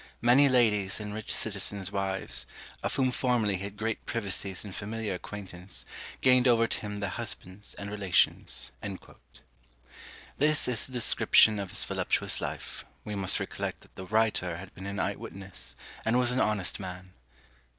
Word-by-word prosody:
Many 130 Hz, +4 st, +6 dB
ladies 110 Hz, -6 st, +3 dB
and 105 Hz, -1 st, -5 dB
rich 110 Hz, 0 st, -5 dB
citizens' 100 Hz, -2 st, -1 dB
wives, 95 Hz, -1 st, -1 dB, 0.3 s
of -, -, -2 dB
whom 130 Hz, -1 st, +2 dB
formerly 120 Hz, -6 st, +1 dB
he 95 Hz, -, -7 dB
had 100 Hz, 0 st, -8 dB
great 110 Hz, 0 st, -2 dB
privacies 100 Hz, -4 st, +1 dB
and 100 Hz, -, -8 dB
familiar 105 Hz, 0 st, -3 dB
acquaintance, 95 Hz, -1 st, -7 dB, 0.4 s
gained 125 Hz, 0 st, +6 dB
over 115 Hz, -2 st, +5 dB
to -, -, -2 dB
him 105 Hz, -1 st, -5 dB
their 100 Hz, -, -1 dB
husbands 95 Hz, +3 st, -2 dB
and 100 Hz, 0 st, -6 dB
relations." 100 Hz, -4 st, +1 dB, 1.7 s
This 150 Hz, +1 st, +2 dB
is 125 Hz, -3 st, 0 dB
the 130 Hz, -, -10 dB
description 110 Hz, -2 st, +5 dB
of 100 Hz, -2 st, -4 dB
his -, -, +6 dB
voluptuous -, -, 0 dB
life; -, -, -5 dB, 0.2 s
we 105 Hz, -, -4 dB
must 95 Hz, -2 st, +2 dB
recollect -, -, -4 dB
that -, -, -20 dB
the 95 Hz, -, -8 dB
writer 105 Hz, -5 st, +1 dB
had 95 Hz, +2 st, -10 dB
been 95 Hz, +1 st, -8 dB
an 100 Hz, 0 st, -4 dB
eye -, -, +1 dB
witness, 95 Hz, -11 st, -7 dB, 0.3 s
and 115 Hz, +2 st, +2 dB
was 125 Hz, -1 st, +4 dB
an 125 Hz, -, 0 dB
honest 105 Hz, -6 st, 0 dB
man. 90 Hz, -1 st, -8 dB
105 Hz, 160 wpm, -29 LUFS, 95-115 Hz, 1.7 s, Many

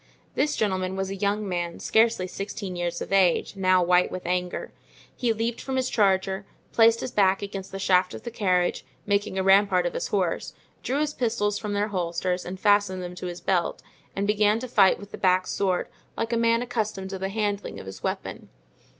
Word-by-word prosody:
This 295 Hz, +2 st, +1 dB
gentleman 190 Hz, -3 st, -1 dB
was 195 Hz, 0 st, -2 dB
a -, -, -3 dB
young 205 Hz, +1 st, -1 dB
man, 175 Hz, -2 st, -3 dB
scarcely 225 Hz, -4 st, +2 dB
sixteen 195 Hz, 0 st, -5 dB
years 175 Hz, -1 st, -3 dB
of -, -, -6 dB
age, 190 Hz, 0 st, +3 dB
now 185 Hz, -1 st, +3 dB
white 180 Hz, +1 st, +3 dB
with 185 Hz, -, -6 dB
anger. 180 Hz, 0 st, -2 dB, 0.4 s
He 240 Hz, -2 st, 0 dB
leaped 225 Hz, +1 st, -2 dB
from 265 Hz, -, -4 dB
his 260 Hz, -1 st, 0 dB
charger, 195 Hz, -2 st, +2 dB, 0.3 s
placed 230 Hz, 0 st, +5 dB
his -, -, -4 dB
back 195 Hz, -2 st, +3 dB
against 195 Hz, -1 st, -6 dB
the 195 Hz, -, -5 dB
shaft 185 Hz, -1 st, +2 dB
of -, -, -9 dB
the 235 Hz, -, -5 dB
carriage, 185 Hz, -5 st, +1 dB, 0.2 s
making 200 Hz, -1 st, 0 dB
a 190 Hz, -, +1 dB
rampart 195 Hz, -2 st, +4 dB
of 175 Hz, -, -1 dB
his -, -, -2 dB
horse, 185 Hz, -4 st, -1 dB, 0.3 s
drew 275 Hz, +4 st, -1 dB
his 300 Hz, -1 st, -1 dB
pistols 205 Hz, -5 st, 0 dB
from 210 Hz, -2 st, -4 dB
their 205 Hz, +1 st, 0 dB
holsters 180 Hz, -1 st, -2 dB
and 185 Hz, +1 st, -6 dB
fastened 205 Hz, -3 st, +2 dB
them 175 Hz, 0 st, -6 dB
to 180 Hz, 0 st, -6 dB
his 175 Hz, 0 st, -6 dB
belt, 180 Hz, -3 st, 0 dB, 0.3 s
and 200 Hz, -, -1 dB
began 210 Hz, +1 st, +3 dB
to 255 Hz, -, -4 dB
fight 200 Hz, -5 st, +4 dB
with 205 Hz, 0 st, -12 dB
the -, -, -8 dB
back 185 Hz, -1 st, +3 dB
sword, 185 Hz, -3 st, 0 dB, 0.3 s
like 230 Hz, +1 st, -2 dB
a -, -, +3 dB
man 230 Hz, +1 st, +2 dB
accustomed 215 Hz, -5 st, -3 dB
to 190 Hz, -, -5 dB
the 190 Hz, +1 st, -2 dB
handling 205 Hz, -1 st, -2 dB
of -, -, -9 dB
his 95 Hz, 0 st, -9 dB
weapon. -, -, -4 dB
195 Hz, 205 wpm, -26 LUFS, 185-210 Hz, 0.4 s, placed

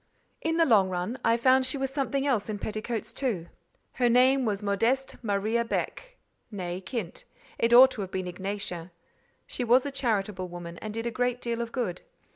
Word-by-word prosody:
In 325 Hz, 0 st, 0 dB
the 330 Hz, -, +5 dB
long 205 Hz, -8 st, +4 dB
run, 185 Hz, +7 st, -3 dB
I 230 Hz, +1 st, +3 dB
found 260 Hz, +2 st, +4 dB
she 260 Hz, +2 st, 0 dB
was 270 Hz, -1 st, -2 dB
something 275 Hz, 0 st, -1 dB
else 235 Hz, -7 st, 0 dB
in 210 Hz, -, -2 dB
petticoats 215 Hz, +3 st, -4 dB
too. 205 Hz, -11 st, -2 dB, 0.4 s
Her 245 Hz, -2 st, +2 dB
name 255 Hz, +2 st, +4 dB
was 205 Hz, -2 st, -1 dB
Modeste 230 Hz, +7 st, 0 dB
Maria 215 Hz, +2 st, 0 dB
Beck, -, -, -4 dB, 0.3 s
née 185 Hz, -2 st, -5 dB
Kint: 210 Hz, -6 st, -5 dB, 0.4 s
it 230 Hz, -, +2 dB
ought 255 Hz, +2 st, +9 dB
to 215 Hz, -, -5 dB
have 190 Hz, -, -4 dB
been 185 Hz, -1 st, -3 dB
Ignacia. 185 Hz, -1 st, -4 dB, 0.6 s
She 250 Hz, -, -4 dB
was 245 Hz, +3 st, +4 dB
a 285 Hz, -, -2 dB
charitable 210 Hz, -8 st, -1 dB
woman, 175 Hz, -1 st, -8 dB
and 215 Hz, -, -6 dB
did 225 Hz, +2 st, -4 dB
a 235 Hz, -, -1 dB
great 245 Hz, +1 st, 0 dB
deal 235 Hz, -1 st, -2 dB
of 235 Hz, -1 st, -4 dB
good. 225 Hz, -10 st, -3 dB
230 Hz, 190 wpm, -28 LUFS, 195-255 Hz, 0.6 s, ought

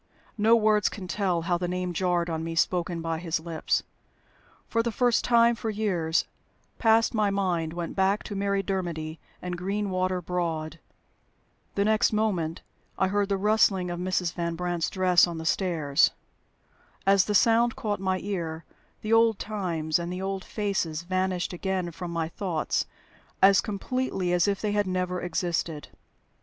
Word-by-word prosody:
No 220 Hz, +2 st, +6 dB
words 215 Hz, -2 st, +3 dB
can 190 Hz, -3 st, -8 dB
tell 180 Hz, -3 st, 0 dB
how 175 Hz, 0 st, 0 dB
the 180 Hz, -, -1 dB
name 180 Hz, 0 st, -2 dB
jarred 175 Hz, -1 st, +1 dB
on 160 Hz, -1 st, -3 dB
me, 165 Hz, 0 st, -4 dB
spoken 170 Hz, -1 st, 0 dB
by 165 Hz, -1 st, -2 dB
his 165 Hz, -2 st, -1 dB
lips. 160 Hz, -1 st, -1 dB, 0.8 s
For 230 Hz, -, +1 dB
the 235 Hz, 0 st, -1 dB
first 245 Hz, +1 st, +2 dB
time 235 Hz, 0 st, +5 dB
for 230 Hz, -1 st, -4 dB
years 185 Hz, -7 st, 0 dB, 0.5 s
past 225 Hz, 0 st, +4 dB
my 215 Hz, -2 st, +2 dB
mind 180 Hz, -5 st, -1 dB
went 170 Hz, -1 st, -5 dB
back 195 Hz, +2 st, +2 dB
to 205 Hz, -, -6 dB
Mary 200 Hz, 0 st, 0 dB
Dermody 170 Hz, -5 st, -3 dB, 0.2 s
and 180 Hz, 0 st, -3 dB
Greenwater 185 Hz, -1 st, -1 dB
Broad. 165 Hz, -3 st, -3 dB, 1.0 s
The 200 Hz, -, +2 dB
next 215 Hz, 0 st, +3 dB
moment 185 Hz, -7 st, -1 dB, 0.3 s
I 190 Hz, -, +2 dB
heard 205 Hz, 0 st, 0 dB
the 200 Hz, -, +1 dB
rustling 195 Hz, -3 st, +2 dB
of 175 Hz, -, -4 dB
Mrs. 180 Hz, -1 st, -1 dB
Van 170 Hz, -1 st, -2 dB
Brandt's 175 Hz, -1 st, -1 dB
dress 180 Hz, -2 st, +4 dB
on 170 Hz, -1 st, -5 dB
the 160 Hz, -, -6 dB
stairs. 160 Hz, -6 st, +2 dB, 1.0 s
As 195 Hz, -1 st, +5 dB
the 210 Hz, -, -1 dB
sound 235 Hz, +2 st, +4 dB
caught 215 Hz, -6 st, -2 dB
my 190 Hz, -1 st, 0 dB
ear, 170 Hz, -5 st, -4 dB, 0.4 s
the 215 Hz, +1 st, 0 dB
old 225 Hz, -2 st, +5 dB
times 170 Hz, -7 st, -1 dB
and 170 Hz, +1 st, -4 dB
the 180 Hz, -, -4 dB
old 195 Hz, -1 st, -3 dB
faces 185 Hz, -7 st, -2 dB
vanished 185 Hz, 0 st, -1 dB
again 185 Hz, -1 st, -2 dB
from 175 Hz, +1 st, -6 dB
my 165 Hz, -1 st, -2 dB
thoughts 170 Hz, -3 st, -2 dB, 0.5 s
as 195 Hz, 0 st, +6 dB
completely 200 Hz, -3 st, -2 dB
as 175 Hz, +2 st, +3 dB
if 200 Hz, -1 st, 0 dB
they 210 Hz, -, 0 dB
had 205 Hz, -1 st, +1 dB
never 180 Hz, -1 st, -1 dB
existed. 170 Hz, -3 st, -2 dB
185 Hz, 165 wpm, -27 LUFS, 170-205 Hz, 1.0 s, No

